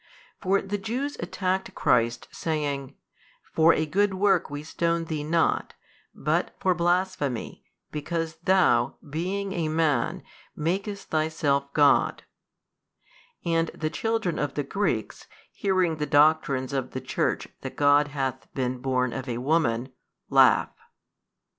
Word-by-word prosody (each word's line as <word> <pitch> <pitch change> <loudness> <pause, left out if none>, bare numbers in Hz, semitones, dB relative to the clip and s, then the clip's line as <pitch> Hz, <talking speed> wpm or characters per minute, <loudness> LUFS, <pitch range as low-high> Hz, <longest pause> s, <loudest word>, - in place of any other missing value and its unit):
For 195 0 +2
the 205 +1 -3
Jews 255 +8 -3
attacked 190 -1 -2
Christ 115 0 +1
saying, 145 -4 -3 0.6
For 160 +1 +6
a 155 - +1
good 195 +5 +1
work 200 +1 +2
we 145 +1 -6
stone 170 +1 -1
Thee 155 -2 -3
not 165 +2 +1 0.4
but 155 +4 -1
for 185 - +2
blasphemy 175 -7 -1 0.3
because 165 +1 -3
Thou, 165 -9 +3
being 190 +6 -3
a 170 -4 -1
Man, 160 +1 0 0.3
makest 195 +6 -3
Thyself 155 -3 0
God: 145 -1 +3 1.2
and 165 -1 +2
the 155 -1 -2
children 225 -4 -1
of 145 -2 -2
the 145 - -1
Greeks, 150 - -2 0.2
hearing 185 -5 +1
the 150 -1 -2
doctrines 145 -3 +3
of 130 -2 -2
the 130 - -4
Church - - -1
that - - -6
God 145 0 +4
hath 135 -3 -4
been 125 -1 -1
born 130 -1 0
of 130 0 -5
a 120 - -2
woman, 130 -3 +1 0.4
laugh. - - +5
155 Hz, 130 wpm, -26 LUFS, 140-185 Hz, 1.2 s, For